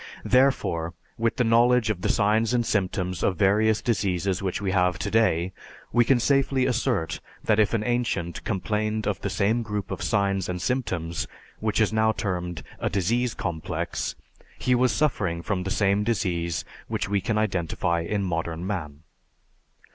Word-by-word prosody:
Therefore, 120 - +2 0.2
with 115 0 +1
the 125 - +2
knowledge 120 0 +4
of 95 -4 -5
the - - 0
signs 110 +3 +2
and 120 -1 +1
symptoms 90 -3 -1
of 95 - +1
various 105 +3 +3
diseases 95 -4 0
which 95 -2 -2
we 100 -1 -1
have 90 -2 +2
today, 95 -5 +1 0.4
we 120 - +5
can 125 +1 +3
safely 135 0 +2
assert 120 -9 0 0.2
that 110 -1 +2
if 110 +2 +3
an 110 - 0
ancient 115 -8 -1
complained 110 +2 -1
of - - -1
the - - -2
same 110 +4 +1
group 105 -3 -4
of - - -4
signs 100 -3 0
and 90 0 -2
symptoms 95 -8 -2 0.3
(which 110 0 0
is 110 -1 +2
now 110 0 +3
termed 90 -5 -3 0.2
a - - 0
"disease 115 +6 0
complex"), 80 -4 -3 0.4
he 125 - +1
was 125 0 +3
suffering 95 - 0
from 100 -2 -1
the 95 - -3
same 100 +1 +2
disease 90 -7 -1 0.2
which - - -2
we 100 0 +1
can 110 +4 -1
identify 85 -4 0
in 100 +4 -1
modern 85 -1 -2
man. 80 -6 -4
100 Hz, 160 wpm, -25 LUFS, 90-115 Hz, 0.4 s, we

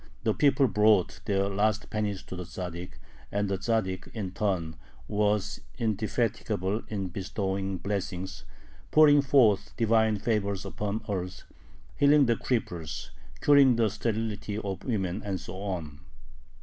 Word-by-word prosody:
The - - +2
people 140 -2 +4
brought 105 -2 +3
their 100 -2 +1
last 105 +2 0
pennies 105 -3 -2
to - - -8
the 90 - -5
Tzaddik, 90 0 -6 0.4
and 100 0 0
the 95 -1 -1
Tzaddik 95 -4 -1
in 100 -5 -3
turn 90 -5 -1 0.3
was 105 -1 0 0.2
indefatigable 110 -2 -1
in 100 -3 -3
bestowing 95 +1 -2
blessings, 95 -1 -4 0.5
pouring 145 -2 +7
forth 125 -7 +3
divine 110 -1 +3
favors 100 -2 -1
upon 105 +2 -3
earth, 95 -3 -4 0.5
healing 145 0 +6
the 120 -1 +3
cripples, 85 -11 -3 0.3
curing 140 -4 +6
the 115 -3 +2
sterility 110 -1 -2
of 100 -3 -4
women, 100 -5 -1
and 95 -3 -2
so 95 +2 -8
on. 85 -7 -4
105 Hz, 130 wpm, -28 LUFS, 95-110 Hz, 0.5 s, pouring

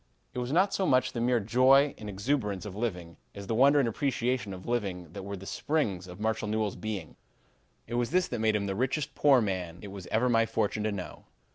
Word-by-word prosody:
It - - -3
was 125 +1 -3
not 190 +5 +3
so 190 - +1
much 130 0 +3
the 120 - -3
mere 120 0 +3
joy 130 +6 +4
and 105 - -7
exuberance 105 -1 -1
of 100 -2 -7
living, 90 -7 -4 0.2
as 100 -1 -7
the 115 - -2
wonder 140 +5 +5
and 135 -4 +3
appreciation 125 -2 -1
of 95 -1 -8
living 95 -8 -3
that 100 - -6
were 100 +1 -6
the 95 - -10
springs 100 - -1
of 90 +2 -10
Marshall 110 0 -1
Newell's 110 -1 -1
being. 105 -7 -5 0.7
"It 120 - -8
was 120 0 0
this 180 +1 +2
that 120 - -3
made 110 -1 +2
him 100 -1 0
the 100 - -2
richest 135 +6 -1
poor 135 -4 +5
man 90 -5 -3
it 100 - -7
was 95 -2 -9
ever 115 +3 +1
my 115 -2 +3
fortune 110 -1 -1
to 110 - +1
know. 95 -3 -7
110 Hz, 230 wpm, -29 LUFS, 100-125 Hz, 0.7 s, wonder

